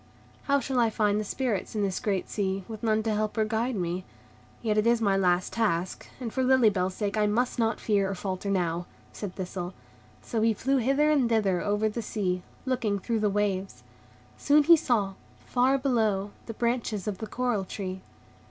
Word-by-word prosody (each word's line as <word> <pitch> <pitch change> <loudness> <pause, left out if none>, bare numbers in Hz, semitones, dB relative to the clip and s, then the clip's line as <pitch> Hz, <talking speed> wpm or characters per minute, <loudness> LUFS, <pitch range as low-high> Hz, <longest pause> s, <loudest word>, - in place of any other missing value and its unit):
"How 280 0 +3
shall 265 -2 -1
I 230 -1 +4
find 210 -1 +1
the - - -1
Spirits 225 -2 -2
in 210 - +1
this 195 -2 -1
great 195 -3 -1
sea, 195 -2 -2
with 220 -2 -7
none 220 -1 +1
to 220 -1 0
help 215 +1 -1
or 220 - +3
guide 225 +3 -1
me? 180 -1 -2 0.6
Yet 215 -2 +1
it 215 +1 +2
is 235 0 +4
my 200 -3 +2
last 180 -1 +1
task, 185 -6 -1
and 235 -4 -5
for 260 - 0
Lily 255 -4 +5
Bell's 185 -1 -1
sake 210 0 -2
I 210 -1 +3
must 240 +4 0
not 225 0 +1
fear 200 -3 +1
or 195 - -3
falter 190 +1 -4
now," 175 -3 0 0.3
said 200 -4 -6
Thistle. 180 -1 -5 0.5
So 225 - -2
he 225 0 +3
flew 270 +6 +1
hither 275 +5 +3
and 270 -6 +3
thither 200 -6 +2
over 205 +1 +1
the 215 +2 -3
sea, 190 -4 -2 0.2
looking 245 -6 0
through 225 +3 -1
the 210 -1 +2
waves. 200 -1 -1 0.6
Soon 295 +1 +5
he 335 +3 +8
saw, 220 -10 0 0.3
far 260 +2 +3
below, 220 -7 +1 0.2
the 225 - -6
branches 235 -4 -1
of 200 -3 -3
the 220 - -5
coral 240 -3 -1
tree. 190 0 -5
215 Hz, 200 wpm, -28 LUFS, 195-235 Hz, 0.6 s, he